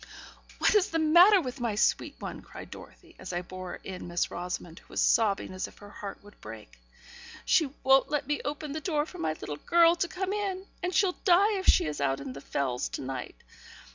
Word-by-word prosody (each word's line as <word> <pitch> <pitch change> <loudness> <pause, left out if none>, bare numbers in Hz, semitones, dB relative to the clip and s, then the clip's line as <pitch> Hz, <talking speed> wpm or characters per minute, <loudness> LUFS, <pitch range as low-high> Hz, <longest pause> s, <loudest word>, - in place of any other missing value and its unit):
'What - - +3
is 415 -3 +3
the 325 - -1
matter 345 +6 +7
with 260 -5 -5
my 235 -3 -1
sweet 210 - +1
one?' - - -7
cried - - -11
Dorothy, 345 -2 -13
as 185 - -7
I 175 +1 -2
bore 185 0 -7
in 185 -2 -7
Miss 175 0 -1
Rosamond, 175 -1 -5
who - - -25
was - - -2
sobbing 205 -4 +2
as 185 - -3
if - - -17
her 205 0 -13
heart 200 -1 -8
would 205 0 -17
break. 105 - -11 0.7
'She 320 -6 +3
won't 265 0 +5
let 295 -2 -1
me 295 +2 -1
open 295 0 -4
the 310 +2 -4
door 300 -3 0
for 360 - -11
my 155 - 0
little 145 - -5
girl 335 - +4
to 350 - 0
come 380 +3 -3
in; 390 -2 -3 0.2
and 360 - -1
she'll 380 -3 +2
die 400 +3 +5
if 380 - -6
she - - +5
is 150 -2 -4
out 135 -1 +1
on 135 -2 -6
the 140 - -9
Fells 130 -3 -2
all - - -7
night. 130 -1 -5
265 Hz, 220 wpm, -29 LUFS, -, 0.7 s, matter